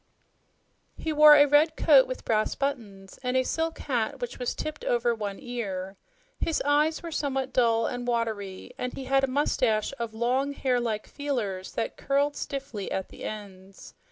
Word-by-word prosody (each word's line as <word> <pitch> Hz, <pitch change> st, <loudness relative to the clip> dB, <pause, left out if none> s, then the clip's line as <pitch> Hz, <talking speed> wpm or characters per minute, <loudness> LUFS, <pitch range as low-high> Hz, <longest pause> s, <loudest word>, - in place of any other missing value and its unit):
He 320 Hz, -, -2 dB
wore 300 Hz, 0 st, +9 dB
a 290 Hz, 0 st, +7 dB
red 295 Hz, +2 st, +4 dB
coat 280 Hz, -5 st, +6 dB
with 255 Hz, -, -6 dB
brass 215 Hz, -1 st, +1 dB
buttons, 215 Hz, -9 st, -4 dB
and 250 Hz, 0 st, 0 dB
a 260 Hz, -, +3 dB
silk 325 Hz, +4 st, -2 dB
hat 260 Hz, 0 st, -2 dB
was 245 Hz, 0 st, -3 dB
tipped 310 Hz, -1 st, -5 dB
over 240 Hz, 0 st, +1 dB
one 205 Hz, -3 st, -4 dB
ear. 195 Hz, -6 st, -5 dB, 0.4 s
His 330 Hz, -, 0 dB
eyes 300 Hz, +3 st, +2 dB
were 335 Hz, -, -6 dB
somewhat 270 Hz, -3 st, -2 dB
dull 230 Hz, -2 st, +3 dB
and 245 Hz, 0 st, -4 dB
watery, 220 Hz, -4 st, -2 dB
and 250 Hz, 0 st, -3 dB
he 270 Hz, -, -6 dB
had 270 Hz, +1 st, +2 dB
a -, -, +3 dB
moustache 255 Hz, -5 st, +1 dB
of 230 Hz, -2 st, -4 dB
long, 255 Hz, +5 st, 0 dB
hair 255 Hz, -3 st, 0 dB
like 220 Hz, -3 st, -2 dB
"feelers" 225 Hz, -10 st, -4 dB
that 225 Hz, -, -3 dB
curled 285 Hz, +1 st, +1 dB
stiffly 270 Hz, -8 st, -5 dB
at 190 Hz, -, -3 dB
the -, -, -9 dB
ends. 195 Hz, -2 st, -9 dB
250 Hz, 170 wpm, -27 LUFS, 220-280 Hz, 0.4 s, wore